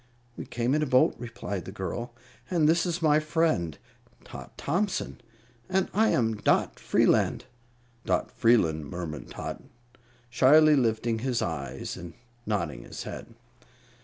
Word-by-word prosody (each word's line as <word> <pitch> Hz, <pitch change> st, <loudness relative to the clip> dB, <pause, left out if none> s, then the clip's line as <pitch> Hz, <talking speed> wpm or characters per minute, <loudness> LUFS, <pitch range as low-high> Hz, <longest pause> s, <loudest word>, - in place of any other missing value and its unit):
"We -, -, -7 dB
came 120 Hz, +2 st, -1 dB
in 155 Hz, -, +2 dB
a 150 Hz, -, 0 dB
boat," 130 Hz, 0 st, +4 dB
replied 115 Hz, -6 st, -5 dB
the -, -, -7 dB
girl; 110 Hz, +5 st, -5 dB, 0.3 s
"and 165 Hz, -4 st, +3 dB
this 170 Hz, +2 st, +3 dB
is 170 Hz, 0 st, -2 dB
my 150 Hz, -1 st, +5 dB
friend, 155 Hz, -, 0 dB, 0.5 s
Tot -, -, -11 dB
Thompson, 190 Hz, -1 st, -2 dB, 0.5 s
and 190 Hz, 0 st, +1 dB
I 220 Hz, +2 st, +3 dB
am 115 Hz, -3 st, +1 dB
Dot -, -, +1 dB
Freeland." -, -, +2 dB, 0.6 s
"Dot -, -, 0 dB
F'eelun," 90 Hz, -10 st, +3 dB
murmured 85 Hz, -1 st, -6 dB
Tot, -, -, -6 dB, 0.7 s
shyly 150 Hz, +5 st, +6 dB
lifting 115 Hz, -3 st, +1 dB
his 125 Hz, 0 st, -1 dB
eyes 70 Hz, -5 st, -4 dB
and 85 Hz, -1 st, -9 dB, 0.3 s
nodding 85 Hz, -10 st, -2 dB
his -, -, -8 dB
head. 115 Hz, -, -8 dB
120 Hz, 135 wpm, -27 LUFS, 95-155 Hz, 0.7 s, shyly